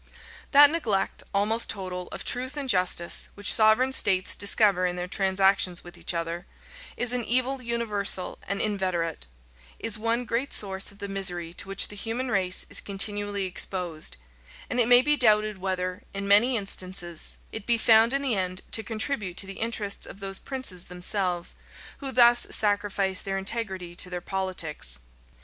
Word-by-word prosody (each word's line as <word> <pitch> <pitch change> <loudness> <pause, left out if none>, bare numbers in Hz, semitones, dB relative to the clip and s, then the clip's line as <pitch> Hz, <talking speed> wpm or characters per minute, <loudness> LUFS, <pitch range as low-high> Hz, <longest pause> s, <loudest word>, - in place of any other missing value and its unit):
} - - -17
That 290 0 +7
neglect, 225 -13 -1
almost 215 +3 0
total, 180 -2 -3
of - - -8
truth 255 +4 0
and 280 -2 -3
justice, 180 -5 +2
which 205 0 +4
sovereign 220 +5 +3
states 190 -6 +3
discover 200 -2 +4
in 175 - -4
their 180 0 -5
transactions 190 -2 +1
with 175 - -12
each - - -3
other, 170 +1 -4 0.5
is 245 0 0
an 250 -1 0
evil 255 +3 +1
universal 210 -6 -2
and 200 +1 -3
inveterate; 185 - -2 0.5
is 225 -1 -3
one 230 +2 -1
great 240 +4 -2
source 195 -1 +2
of 200 - -18
the 200 -1 -6
misery 180 -4 -1
to 185 - -4
which 195 0 +1
the 210 - -9
human 230 +4 -4
race 185 -2 +1
is 200 - +1
continually 205 0 0
exposed; 175 - -2 0.5
and 250 - -1
it 235 - +3
may 245 +1 +7
be 295 +2 +3
doubted 215 -4 +2
whether, 185 0 -3
in 200 0 -3
many 230 +5 +4
instances, 185 -4 -3
it 220 -2 -8
be 235 -1 +3
found 225 +1 +5
in 275 +1 -1
the 265 -4 +1
end 185 -2 -2
to 225 - +1
contribute 215 -4 -3
to - - +1
the 195 0 -8
interests 220 -3 -3
of 195 - -11
those 195 -1 -4
princes 255 -10 -4
themselves, 180 -1 -2 0.5
who 275 -2 -4
thus 240 -1 +5
sacrifice 205 -2 +2
their 195 0 -4
integrity 190 -3 -4
to 180 +1 -2
their 180 -1 -4
politics. 170 - 0
200 Hz, 170 wpm, -26 LUFS, 185-230 Hz, 0.5 s, That